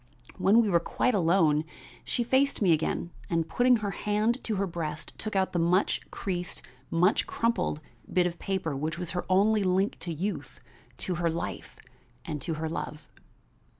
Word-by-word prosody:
When 215 +5 +5
we - - 0
were 170 - +5
quite 250 +8 0
alone, 165 -5 +3 0.4
she 240 - 0
faced 265 +3 +2
me 190 -5 +4
again 160 +2 -1 0.2
and 165 -1 0
putting 250 0 +4
her 200 - -1
hand 210 +5 0
to 220 - -1
her 200 0 +1
breast 160 -4 -5
took 215 -2 -4
out 190 -1 +1
the 175 - +1
much 175 +4 +2
creased, 180 -2 -4 0.3
much 180 +5 +3
crumpled 230 -9 0 0.3
bit 180 -1 +3
of 175 -1 -3
paper 190 -7 -2
which 155 +4 -2
was 175 -2 -3
her 180 - -3
only 205 +3 +4
link 190 +2 +1
to 175 - -5
youth, 185 +6 -4 0.5
to 180 - -1
her 170 - +2
life, 165 +1 -4 0.5
and 150 -2 -4
to 160 +3 -2
her 160 +1 -3
love. 155 -1 -5
180 Hz, 175 wpm, -28 LUFS, 165-205 Hz, 0.5 s, When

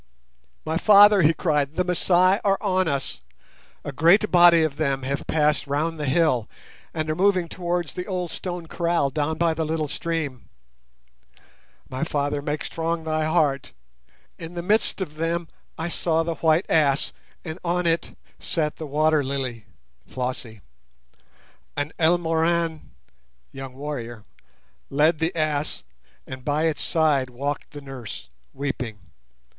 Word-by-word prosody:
"My 160 +1 0
father," 205 +1 +7
he 155 -1 +5
cried, 150 -3 0
"the 180 - +2
Masai 180 +2 +3
are 195 -1 +3
on 185 -3 +1
us! 140 - -2 0.6
A 145 - -4
great 170 +10 +4
body 175 -2 +7
of 150 -3 -1
them 140 -3 0
have 140 +2 -3
passed 150 -1 +1
round 155 +3 -1
the 145 - -2
hill 130 -6 +2 0.4
and 155 -1 -3
are 155 - -1
moving 185 -1 +2
towards 175 -2 -3
the 180 - -5
old 180 -4 -3
stone 175 -1 -5
kraal 170 -4 0
down 150 +2 -1
by 170 -1 +2
the 160 0 -2
little 155 -1 -1
stream. 150 -4 -4 1.4
My 130 +4 -4
father, 145 -2 -1
make 150 +1 -3
strong 165 0 -2
thy 155 -1 0
heart! 150 - +1 0.7
In 165 +1 -8
the 170 - -4
midst 210 +1 +1
of 155 -5 -5
them 165 +1 -1 0.3
I 160 - -2
saw 165 -1 +1
the 165 0 -2
white 160 +2 +2
ass, 145 -3 +2 0.3
and 160 +1 -6
on 175 0 0
it 165 0 0 0.2
sat 150 -3 -2
the 155 - -6
Water 155 +1 +2
lily 130 -4 -4 0.4
[Flossie]. 125 -4 -4 1.2
An 145 +2 -2
Elmoran 165 -1 +1 0.6
[young 135 -1 -8
warrior] 120 -6 -6 0.6
led 150 +3 +3
the 165 +2 -1
ass, 155 -2 -1 0.4
and 130 -1 -8
by 150 +3 0
its 160 -2 0
side 150 -5 +2
walked 140 +4 -4
the 145 - -9
nurse 135 -5 -8 0.2
weeping. 130 -5 -4
155 Hz, 145 wpm, -24 LUFS, 145-170 Hz, 1.4 s, father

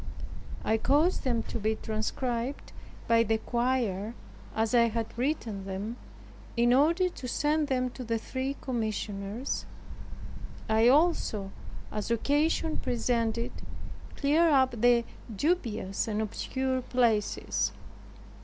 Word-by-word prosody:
I 220 - +3
caused 295 +9 +2
them 235 -3 +1
to - - -5
be 220 +1 +1
transcribed 235 +4 -3 0.4
by 230 0 +5
the 225 0 +2
quire, 235 -3 -1 0.4
as 220 +1 +1
I 235 -1 +6
had 230 0 -3
written 235 -6 -2
them, 195 +4 -4 0.6
in 240 +1 +4
order 330 +7 +4
to 270 -7 -7
send 295 +4 +1
them 255 -2 0
to 255 - -7
the 230 -1 0
three 260 +4 -3
commissioners. 215 -1 -3 1.0
I 220 +1 +4
also, 255 - +3 0.4
as 210 +1 -3
occasion 295 +7 +1
presented, 235 -1 0 0.6
cleared 310 +3 +3
up 265 -2 +4
the 240 -1 +5 0.3
dubious 230 - 0
and 215 -1 -1
obscure 260 +4 -1
places. 210 - +1
235 Hz, 115 wpm, -29 LUFS, 220-265 Hz, 1.0 s, I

